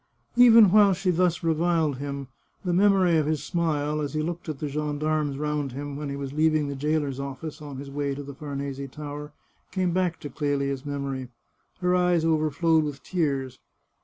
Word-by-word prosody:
Even 230 -5 +8
while 205 -1 +6
she 185 0 0
thus 175 0 +1
reviled 165 -3 +1
him 140 -1 -5 0.4
the 175 - +1
memory 190 -2 +4
of 155 -2 +1
his 155 -2 -1
smile, 150 -3 -1
as 145 +1 -4
he 155 - 0
looked 170 0 -4
at 155 - -3
the 150 - -3
gendarmes 150 0 -1
round 150 -2 -2
him 145 +1 -5
when 145 0 -4
he 140 - -3
was 140 -1 -5
leaving 155 -1 +2
the 140 - -4
jailer's 145 -1 -1
office 140 +3 -6
on 145 -3 -7
his 140 +1 -8
way 140 -1 -2
to 145 - -6
the 140 0 -8
Farnese 140 -1 -5
Tower, 150 +1 -7 0.4
came 185 -2 0
back 180 -2 0
to 145 - -6
Clelia's 140 -1 -1
memory. 140 -3 -4 0.5
Her 180 0 +2
eyes 180 -2 +3
overflowed 160 0 +2
with 145 -3 -5
tears. 140 -7 -1
150 Hz, 185 wpm, -26 LUFS, 140-165 Hz, 0.5 s, Even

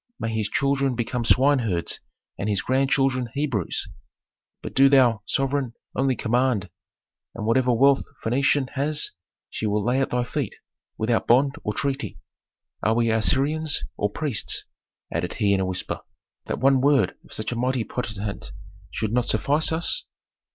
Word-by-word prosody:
May 115 0 -2
his 110 -1 -1
children 140 -2 +1
become 120 +1 -2
swineherds 120 -8 +2 0.4
and 100 - -3
his 100 -2 0
grandchildren 135 -1 +1
Hebrews. 135 - -1 0.8
But - - -6
do 135 +1 +6
thou, 125 -6 +4
sovereign, 135 -2 0 0.2
only 135 -1 +2
command, 120 -6 0 0.6
and 110 - -4
whatever 125 +3 +3
wealth 135 +3 +4 0.2
Phœnicia 135 +3 +2
has 145 +2 -1 0.4
she 110 - -2
will 105 0 0
lay 125 +3 +2
at 135 - 0
thy 125 0 0
feet 120 - -3 0.4
without 115 +1 0
bond 135 +4 +4
or 105 - -2
treaty. 140 0 -2 0.6
Are 110 - +2
we 115 -1 +2
Assyrians 145 +7 +1
or 105 - 0
priests," 130 +1 -1 0.5
added 85 +2 -2
he 105 -3 +2
in 100 - +2
a 95 - 0
whisper, 90 -1 -3 0.5
"that - - -2
one 135 0 +4
word 135 -8 +4
of - - -20
such 110 +2 -3
a - - -2
mighty 125 0 0
potentate 105 -4 -5 0.4
should 110 0 -3
not 125 -1 +2
suffice 150 +3 +2
us?" 160 +1 0
125 Hz, 150 wpm, -24 LUFS, 110-135 Hz, 0.8 s, do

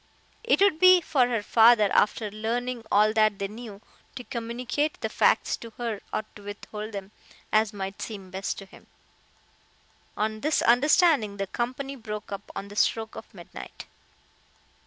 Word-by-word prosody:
It 465 - +3
would 395 -6 +4
be 370 0 +8
for 275 -7 +2
her 230 -4 -1
father, 225 0 +6
after 210 0 +2
learning 235 +3 -3
all 215 +1 +4
that 215 -2 +3
they 200 - -2
knew, 210 -1 -10 0.3
to 250 - -6
communicate 245 +6 -3
the - - -3
facts - - +2
to 230 - -10
her 230 -4 -3
or - - -1
to 205 - -12
withhold 210 +1 -8
them, 200 0 -7 0.4
as 215 0 +3
might 195 -1 -6
seem 195 -4 -7
best 190 +1 -3
to 195 - -8
him. - - -18 1.3
On 215 +1 -1
this 305 +1 +1
understanding 250 - +4
the 195 - -2
company 255 +6 -4
broke 210 -5 -7
up 200 - -7
on 200 - -6
the 205 - -11
stroke 220 +1 0
of - - -10
midnight. - - -11
220 Hz, 160 wpm, -26 LUFS, 205-245 Hz, 1.3 s, be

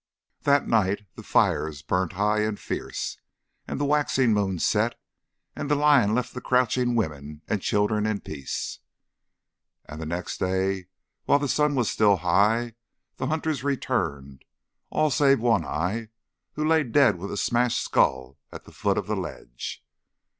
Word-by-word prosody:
That 140 0 +3
night 105 -2 +1
the - - -10
fires 75 -3 +1
burnt 90 -1 -1
high 105 +3 +1
and 105 -1 -1
fierce, - - -4 0.5
as - - -4
the 145 - 0
waxing 140 -5 +2
moon 100 -3 0
set, - - +1 0.6
and - - -4
the 145 - +3
lion 140 -8 +4
left 125 0 -2
the 125 - -6
crouching 125 -1 +1
women 75 -7 -3
and 105 - -1
children 105 +2 +1
in 105 -2 -1
peace. 70 -3 -5 1.1
And 75 +2 -9
the 80 - -4
next 85 +2 -4
day, 95 0 -1 0.4
while - - +4
the 145 0 -2
sun 150 +1 +2
was 125 -4 +1
still 105 -2 +4
high, 105 +7 +2 0.4
the 130 - -2
hunters 155 -2 -1
returned 80 - -2 0.5
all 155 -1 +1
save 135 +1 +4
One 115 -6 +2
Eye, 95 +10 -2 0.4
who 155 +1 -1
lay 160 0 +4
dead 130 -5 +3
with 100 +3 -6
a - - -4
smashed 120 0 +1
skull 65 +1 0
at - - -9
the - - -14
foot - - 0
of - - -1
the - - -2
ledge. - - -7
110 Hz, 160 wpm, -25 LUFS, 90-130 Hz, 1.1 s, lion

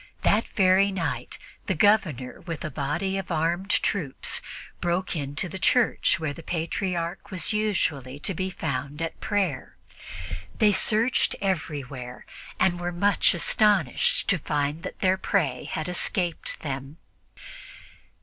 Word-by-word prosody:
That 215 +3 +3
very 190 0 +4
night 170 -5 -3 0.3
the 190 - +1
Governor, 160 - +2
with 165 -4 -5
a 155 - -4
body 155 +8 -1
of 190 - -7
armed 170 +4 0
troops, 170 -10 0 0.4
broke 175 +2 -1
into 145 +3 -2
the 190 +2 -7
church 245 -7 +3
where 155 -3 -2
the 165 - -10
Patriarch 170 +2 -3
was 190 +2 0
usually 160 -11 0
to 195 - -1
be 185 +2 -2
found 140 -4 -4
at 165 0 -4
prayer. 190 -11 -1 0.8
They 210 -1 +5
searched 225 +5 +2
everywhere 140 -9 -3 0.3
and 175 -2 +2
were 175 0 -2
much 185 +2 +3
astonished 190 - +3
to 190 -4 +3
find 145 +1 -1
that - - -8
their 185 0 +3
prey 150 -12 0
had 155 -1 -3
escaped 180 -1 -1
them. 140 +1 -5
175 Hz, 130 wpm, -26 LUFS, 145-195 Hz, 0.8 s, They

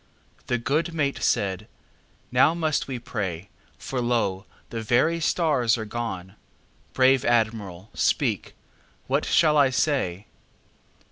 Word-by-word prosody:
The 125 - +1
good 155 +7 -1
mate 140 -3 -1
said: 100 +1 0 0.6
"Now 165 - +4
must 160 -3 0
we 130 -2 -4
pray, 100 -7 -5 0.3
For 130 -2 -4
lo! 115 -6 -1 0.2
the 115 - -4
very 130 +10 +2
stars 145 -9 +2
are 110 - -4
gone. 105 -5 -5 0.6
Brave 130 0 +4
Admiral, 110 -5 -1
speak, - - 0 0.5
what - - 0
shall 155 -2 +4
I 140 -2 +5
say?" 125 - 0
120 Hz, 120 wpm, -25 LUFS, 105-140 Hz, 0.6 s, I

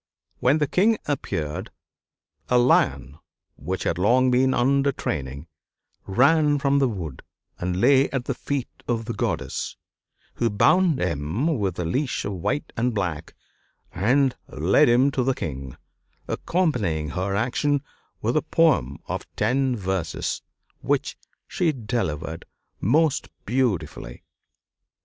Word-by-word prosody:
When 135 +5 +3
the 150 - +2
King 210 +10 +3
appeared, 80 - -3 0.8
a 125 - +4
lion, 120 - +2 0.4
which 90 +6 -4
had 85 - -1
long 125 +6 +4
been 130 +1 +3
under 140 +3 +2
training, 70 - -4 0.6
ran 145 +7 +4
from 140 0 +2
the 135 - +3
wood 85 - -6 0.4
and 90 +1 -2
lay 135 +4 +5
at 130 -3 -3
the 135 - -1
feet 135 0 -3 0.2
of 115 -2 -1
the 115 - -3
Goddess, - - -3 0.6
who 115 - 0
bound 170 - +3
him 90 - -1
with 95 -4 -1
a 90 - -2
leash 130 - -1
of 100 - -2
white 95 - -2
and 120 0 0
black 85 -6 -3 0.6
and 130 +7 +2
led 100 - +3
him 130 +4 +4
to 135 - 0
the 130 +1 +1
king, 70 - -6 0.5
accompanying 105 - 0
her 95 +4 -2
action 135 +6 0 0.4
with 115 +3 +1
a 155 - +3
poem 155 - +2
of - - -5
ten 130 +4 +1
verses, 95 -5 -2 0.4
which - - -1 0.3
she 170 -3 +1
delivered 85 - -3 0.3
most 145 - +2 0.2
beautifully. 95 - -2
120 Hz, 130 wpm, -24 LUFS, 90-140 Hz, 0.8 s, lay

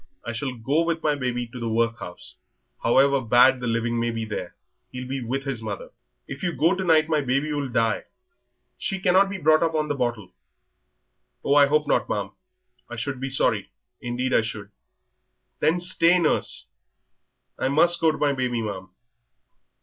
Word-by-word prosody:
I 120 - -3
shall 125 +3 -3
go 135 +7 0
with 165 -1 -1
my 150 - +2
baby 125 -3 -2
to 120 +2 -10
the 115 -1 -3
workhouse. 115 -5 -2 0.5
However 135 +3 +3
bad 125 +2 +5
the 125 - -4
living 115 0 -1
may 120 0 0
be 115 -1 -3
there, 100 -5 -6 0.4
he'll 125 0 -6
be 135 0 -3
with 135 +4 -3
his 135 -4 -4
mother." 105 -3 -6 0.4
"If 140 0 -8
you 175 -2 -1
go 165 +4 +2
to 190 0 -3
night 160 -3 +4
my 155 -2 +1
baby 140 +3 -1
will 145 -2 -2
die. 115 -2 0 0.7
She 195 - -2
cannot 190 +1 +3
be 200 - -4
brought 155 -2 +3
up 165 -1 0
on 155 -1 -1
the 145 - 0
bottle." 120 -6 -3 1.1
"Oh, 140 - +1
I 145 -1 +6
hope 150 +1 +2
not, - - +1
ma'am. - - -2 0.6
I 120 - -6
should 130 +3 -3
be 135 +1 -3
sorry, 135 - +1 0.3
indeed 125 +2 -2
I - - +5
should." 105 -2 -5 0.9
"Then 160 +4 +2
stay, 175 0 +3
nurse." 165 -4 0 0.9
"I 130 - 0
must 170 +5 +4
go 160 -1 +4
to 155 - -6
my 145 -1 +1
baby, 125 -3 -2
ma'am." 95 -3 -6
135 Hz, 180 wpm, -24 LUFS, 115-155 Hz, 1.1 s, I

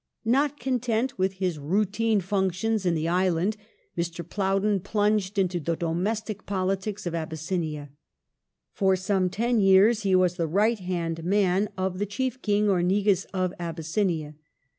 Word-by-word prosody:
Not 280 +5 +2
content 245 -1 -1
with 190 +1 +1
his 185 -4 -2
routine 205 +7 +1
functions 195 +2 0
in 170 - +2
the 160 0 -1
island, 180 +3 +1 0.4
Mr. 170 -1 -4
Plowden 195 +1 +1
plunged 205 0 0
into 185 -2 +1
the 165 +1 -1
domestic 200 +6 -2
politics 195 +1 -2
of 175 - -3
Abys 160 -2 -4
sinia. 155 -5 -3 0.8
For 190 -2 +2
some 185 0 0
ten 235 +5 0
years 200 +3 +5
he 195 -2 +2
was 180 -1 +2
the 165 -2 0
right 210 +7 +2
hand 170 -3 -3
man 195 +2 +2
of 185 0 -2
the 205 - -1
chief 255 +5 -3
King 210 0 +2
or 190 -3 +2
Negus 195 +1 +2
of 185 -1 -2
Abyssinia. 165 -1 -2
190 Hz, 150 wpm, -26 LUFS, 175-210 Hz, 0.8 s, years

